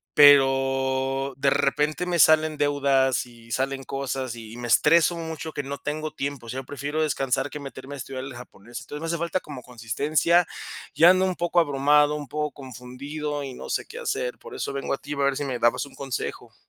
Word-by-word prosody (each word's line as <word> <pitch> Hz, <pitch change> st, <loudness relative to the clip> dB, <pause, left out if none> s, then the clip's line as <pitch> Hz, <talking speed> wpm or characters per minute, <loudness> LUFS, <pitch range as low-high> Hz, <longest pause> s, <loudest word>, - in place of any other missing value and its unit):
pero 135 Hz, -1 st, +4 dB
de 140 Hz, 0 st, +3 dB
repente 150 Hz, +4 st, +1 dB
me 175 Hz, -1 st, -1 dB
salen 155 Hz, 0 st, +5 dB
deudas 140 Hz, -3 st, +2 dB
y 115 Hz, -1 st, -16 dB
salen 135 Hz, +1 st, -1 dB
cosas, 135 Hz, -2 st, -3 dB
y 115 Hz, 0 st, -10 dB
me 120 Hz, 0 st, -5 dB
estreso 170 Hz, +6 st, +4 dB
mucho 160 Hz, -1 st, -5 dB
que 145 Hz, -, -2 dB
no 140 Hz, +1 st, -5 dB
tengo 155 Hz, +1 st, -3 dB
tiempo. 140 Hz, -4 st, -4 dB
O -, -, -8 dB
sea, 130 Hz, +2 st, -4 dB
prefiero 145 Hz, +4 st, -3 dB
descansar 135 Hz, -3 st, 0 dB
que 150 Hz, -, -7 dB
meterme 135 Hz, 0 st, -8 dB
a -, -, -8 dB
estudiar 130 Hz, 0 st, -6 dB
el 135 Hz, -, -8 dB
japonés. 120 Hz, -1 st, -10 dB
Entonces, 150 Hz, +1 st, -8 dB
me 165 Hz, -, -3 dB
hace 170 Hz, +1 st, -1 dB
falta 170 Hz, +2 st, -1 dB
como 140 Hz, -4 st, -9 dB
consistencia. 145 Hz, +9 st, +1 dB, 0.5 s
Ya 170 Hz, +2 st, +7 dB
ando 185 Hz, 0 st, +3 dB
un 185 Hz, -1 st, -1 dB
poco 175 Hz, 0 st, +1 dB
abrumado, 145 Hz, 0 st, +3 dB
un 145 Hz, -2 st, -6 dB
poco 150 Hz, 0 st, -2 dB
confundido, 140 Hz, +3 st, -6 dB
y 135 Hz, -, -6 dB
no -, -, -9 dB
sé -, -, -1 dB
qué 470 Hz, -, -9 dB
hacer, 480 Hz, +2 st, -2 dB
por 470 Hz, -3 st, -10 dB
eso 400 Hz, -, -3 dB
vengo 140 Hz, 0 st, -2 dB
a -, -, -1 dB
ti 145 Hz, -, -6 dB
a -, -, -6 dB
ver 140 Hz, -1 st, +2 dB
si 145 Hz, -, -2 dB
me 125 Hz, -3 st, -3 dB
dabas 120 Hz, +4 st, +2 dB
un 140 Hz, -, -15 dB
consejo. 135 Hz, -2 st, -5 dB
140 Hz, 210 wpm, -25 LUFS, 135-155 Hz, 0.5 s, Ya